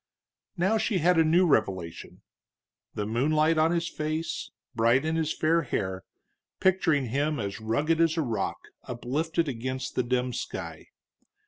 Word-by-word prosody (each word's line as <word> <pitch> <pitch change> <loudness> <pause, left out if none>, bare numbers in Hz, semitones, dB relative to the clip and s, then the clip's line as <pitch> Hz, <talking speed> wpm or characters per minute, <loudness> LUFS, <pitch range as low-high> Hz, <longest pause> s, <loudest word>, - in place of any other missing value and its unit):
Now 195 +6 +2
she 220 -2 0
had 175 0 +3
a - - +6
new 170 +4 +4
revelation, 95 - -1 0.7
the 105 - -2
moonlight 155 +8 +2
on 160 +1 +4
his 170 0 0
face, 155 0 -3 0.2
bright 120 +5 +3
in 160 +1 0
his 160 -1 0
fair 165 +2 +2
hair, 95 - -3 0.5
picturing 165 - +2
him 145 +4 0
as 100 0 -4
rugged 150 +9 +1
as 165 0 +2
a 160 - +2
rock 110 -7 -2 0.3
uplifted 150 +7 -1
against 130 0 -4
the - - +1
dim 125 0 -1
sky. - - -6
150 Hz, 145 wpm, -27 LUFS, 120-165 Hz, 0.7 s, a